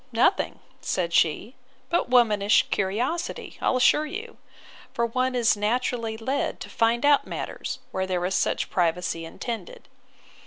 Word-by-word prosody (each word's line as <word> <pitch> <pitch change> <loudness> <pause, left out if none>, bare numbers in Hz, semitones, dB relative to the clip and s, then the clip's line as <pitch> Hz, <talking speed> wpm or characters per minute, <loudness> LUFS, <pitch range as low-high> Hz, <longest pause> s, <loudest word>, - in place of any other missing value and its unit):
Nothing, 235 - +2 0.2
said 170 -2 -1
she, 170 +10 +2 0.4
but 340 -7 +1
womanish 215 -4 +4
curiosity, 235 - -2
I'll - - +2
assure 300 +4 +4
you; 435 +8 -7 0.6
for 235 -2 +1
one 255 +2 -1
is 235 -3 +3
naturally 225 +1 -1
led 265 +5 -2
to - - -8
find 230 +3 +2
out 290 -1 +4
matters, - - -5
where 190 0 -2
there 180 -1 -1
is 185 - -1
such - - 0
privacy 170 -1 0
intended. 240 - -7
230 Hz, 140 wpm, -25 LUFS, 190-255 Hz, 0.6 s, womanish